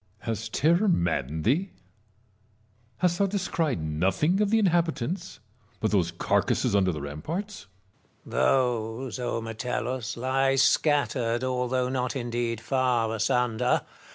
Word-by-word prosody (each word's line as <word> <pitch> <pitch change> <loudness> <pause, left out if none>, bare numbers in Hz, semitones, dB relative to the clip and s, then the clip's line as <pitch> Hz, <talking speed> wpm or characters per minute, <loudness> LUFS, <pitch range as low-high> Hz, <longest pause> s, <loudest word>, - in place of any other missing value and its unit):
Metellus. 115 -3 -3
Has 110 - -6
terror 170 - +2
maddened 80 - 0
thee 165 - +1
1 - - -30 1.2
hast 175 +3 +1
thou 200 - +3
descried 170 - -1
nothing 95 - +1
of 210 - +2
the 225 - +3
inhabitants 175 - 0 0.4
but 110 - 0
those 90 -5 +2
carcasses 85 +3 +1
under 95 -2 +3
the 75 -3 -5
ramparts 130 - -5 0.6
1 - - -12
Marius. - - +3 0.6
Those, 130 - -6
O 120 -2 -2
Metellus, 125 +2 -3
lie 135 +2 +1
scattered, 130 -5 +2
although 125 0 0
not 125 -1 -2
indeed 120 -2 -2
far 125 -4 +1
asunder. 115 +1 +1
125 Hz, 130 wpm, -27 LUFS, 110-160 Hz, 1.2 s, thou